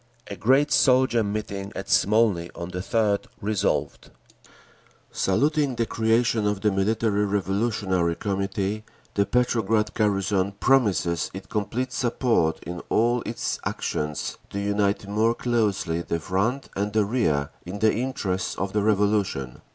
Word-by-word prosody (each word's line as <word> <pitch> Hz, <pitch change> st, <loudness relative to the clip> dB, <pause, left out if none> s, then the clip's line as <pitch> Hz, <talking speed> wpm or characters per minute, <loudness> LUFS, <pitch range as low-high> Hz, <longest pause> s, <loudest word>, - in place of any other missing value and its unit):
A -, -, -4 dB
great 135 Hz, +9 st, +3 dB
soldier 130 Hz, -3 st, +4 dB
meeting 100 Hz, -1 st, -4 dB
at 95 Hz, -, -5 dB
Smolny 105 Hz, -4 st, +3 dB
on 85 Hz, 0 st, -6 dB
the 90 Hz, -, -5 dB
3d 100 Hz, +1 st, +1 dB
resolved: 105 Hz, -1 st, -1 dB, 1.0 s
Saluting 145 Hz, +6 st, +1 dB
the 115 Hz, -, 0 dB
creation 115 Hz, 0 st, +1 dB
of 105 Hz, -1 st, -1 dB
the 105 Hz, 0 st, +2 dB
Military 105 Hz, +1 st, +1 dB
Revolutionary 95 Hz, -3 st, 0 dB
Committee, 100 Hz, +1 st, -2 dB, 0.3 s
the 100 Hz, 0 st, +1 dB
Petrograd 110 Hz, -3 st, +1 dB
garrison 100 Hz, -2 st, +1 dB
promises 100 Hz, -, +2 dB
it 95 Hz, 0 st, -8 dB
complete 120 Hz, +5 st, -2 dB
support 120 Hz, -10 st, +1 dB
in 90 Hz, 0 st, -6 dB
all 120 Hz, +2 st, +2 dB
its 115 Hz, -, -3 dB
actions, 75 Hz, 0 st, -3 dB
to 100 Hz, -, -4 dB
unite 100 Hz, 0 st, 0 dB
more 110 Hz, +3 st, +2 dB
closely 105 Hz, -9 st, 0 dB
the 85 Hz, -1 st, -2 dB
front 100 Hz, -, -1 dB
and 105 Hz, +1 st, -2 dB
the 110 Hz, -1 st, +3 dB
rear 80 Hz, -, 0 dB
in 90 Hz, +3 st, -6 dB
the 110 Hz, +1 st, +3 dB
interests 110 Hz, -7 st, -2 dB
of 95 Hz, 0 st, -3 dB
the 105 Hz, -, +2 dB
Revolution. 100 Hz, -, 0 dB
105 Hz, 135 wpm, -25 LUFS, 95-115 Hz, 1.0 s, soldier